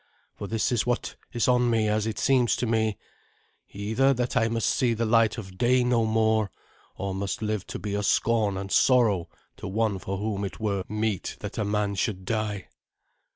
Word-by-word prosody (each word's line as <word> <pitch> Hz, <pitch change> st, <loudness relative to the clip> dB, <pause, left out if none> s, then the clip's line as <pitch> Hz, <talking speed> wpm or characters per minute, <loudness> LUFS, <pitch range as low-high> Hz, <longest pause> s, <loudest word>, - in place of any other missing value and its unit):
For 100 Hz, -, -7 dB
this 110 Hz, +3 st, 0 dB
is 120 Hz, -3 st, +2 dB
what 120 Hz, 0 st, -1 dB, 0.2 s
is 120 Hz, -2 st, 0 dB
on 125 Hz, -1 st, +3 dB
me, 110 Hz, -2 st, +2 dB
as 105 Hz, +1 st, 0 dB
it 110 Hz, -2 st, -3 dB
seems 125 Hz, +2 st, +3 dB
to 125 Hz, -, -2 dB
me 110 Hz, -2 st, 0 dB, 0.7 s
either 110 Hz, +7 st, +1 dB
that 125 Hz, 0 st, -2 dB
I 115 Hz, -, +3 dB
must 115 Hz, -1 st, -1 dB
see 120 Hz, -3 st, +2 dB
the 115 Hz, +1 st, -1 dB
light 115 Hz, -1 st, +3 dB
of 95 Hz, -4 st, -9 dB
day 125 Hz, +1 st, +3 dB
no 120 Hz, -2 st, +2 dB
more, 110 Hz, -1 st, +2 dB, 0.5 s
or 100 Hz, 0 st, -3 dB
must 100 Hz, +3 st, -3 dB
live 105 Hz, -3 st, -2 dB
to -, -, -5 dB
be 100 Hz, +2 st, -4 dB
a 105 Hz, -, 0 dB
scorn 105 Hz, -1 st, +1 dB
and 95 Hz, 0 st, -5 dB
sorrow 115 Hz, -9 st, +3 dB, 0.3 s
to -, -, -7 dB
one 105 Hz, 0 st, 0 dB
for 95 Hz, +1 st, -4 dB
whom 100 Hz, 0 st, -2 dB
it 100 Hz, -, -5 dB
were 100 Hz, -3 st, -1 dB
meet 105 Hz, -2 st, -2 dB
that 105 Hz, +2 st, -5 dB
a -, -, +1 dB
man 105 Hz, 0 st, 0 dB
should 95 Hz, -1 st, -2 dB
die." 105 Hz, -2 st, -2 dB
110 Hz, 200 wpm, -26 LUFS, 100-115 Hz, 0.7 s, on